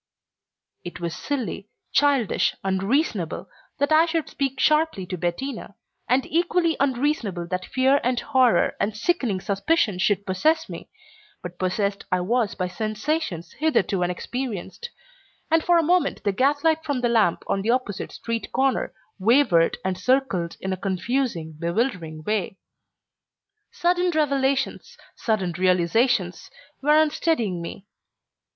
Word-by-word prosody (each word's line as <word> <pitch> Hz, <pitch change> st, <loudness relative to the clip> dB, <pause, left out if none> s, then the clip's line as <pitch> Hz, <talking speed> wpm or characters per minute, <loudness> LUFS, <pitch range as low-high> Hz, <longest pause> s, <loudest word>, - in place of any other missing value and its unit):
It 175 Hz, -, -8 dB
was 170 Hz, -2 st, -3 dB
silly, 240 Hz, -7 st, -4 dB, 0.2 s
childish, 275 Hz, -6 st, +2 dB
unreasonable, 195 Hz, -, -1 dB, 0.3 s
that 285 Hz, +2 st, 0 dB
I 315 Hz, +2 st, +5 dB
should 325 Hz, -2 st, -1 dB
speak 270 Hz, -1 st, -2 dB
sharply 305 Hz, -, +2 dB
to 185 Hz, 0 st, -4 dB
Bettina, 200 Hz, +6 st, -4 dB, 0.3 s
and 255 Hz, +2 st, +3 dB
equally 340 Hz, 0 st, +1 dB
unreasonable 255 Hz, -, 0 dB
that 185 Hz, 0 st, -2 dB
fear 265 Hz, +2 st, +3 dB
and 245 Hz, 0 st, +1 dB
horror 255 Hz, -2 st, +3 dB
and 210 Hz, +1 st, -1 dB
sickening 240 Hz, -, 0 dB
suspicion 200 Hz, -, 0 dB
should 200 Hz, +1 st, +1 dB
possess 315 Hz, -, +1 dB
me, -, -, -9 dB, 0.5 s
but 175 Hz, 0 st, -8 dB
possessed 200 Hz, +2 st, -1 dB
I 180 Hz, -, +2 dB
was 225 Hz, +3 st, 0 dB
by 185 Hz, -1 st, -2 dB
sensations 215 Hz, -, -3 dB
hitherto 205 Hz, -, +1 dB
unexperienced, 210 Hz, -, -4 dB, 0.6 s
and 325 Hz, 0 st, +4 dB
for 350 Hz, -1 st, +4 dB
a 335 Hz, -, +3 dB
moment 355 Hz, +2 st, +1 dB
the 205 Hz, -, +2 dB
gaslight 295 Hz, +8 st, +2 dB
from 285 Hz, -5 st, -2 dB
the 245 Hz, -, +2 dB
lamp 220 Hz, -7 st, +2 dB
on 195 Hz, -, -1 dB
the 215 Hz, -, -2 dB
opposite 240 Hz, -5 st, -1 dB
street 230 Hz, -1 st, -4 dB
corner 265 Hz, 0 st, 0 dB, 0.2 s
wavered 205 Hz, -6 st, +4 dB
and 185 Hz, -1 st, -1 dB
circled 195 Hz, -8 st, 0 dB
in 190 Hz, 0 st, -2 dB
a -, -, -4 dB
confusing, 190 Hz, -2 st, -2 dB
bewildering 170 Hz, -4 st, -2 dB
way. 200 Hz, 0 st, -2 dB, 1.1 s
Sudden 355 Hz, +1 st, +1 dB
revelations, 275 Hz, -4 st, 0 dB, 0.2 s
sudden 195 Hz, -6 st, -1 dB
realizations, 185 Hz, +2 st, +1 dB, 0.3 s
were 300 Hz, +2 st, +4 dB
unsteadying 295 Hz, -, +1 dB
me. 180 Hz, +4 st, -8 dB
235 Hz, 130 wpm, -24 LUFS, 185-285 Hz, 1.1 s, I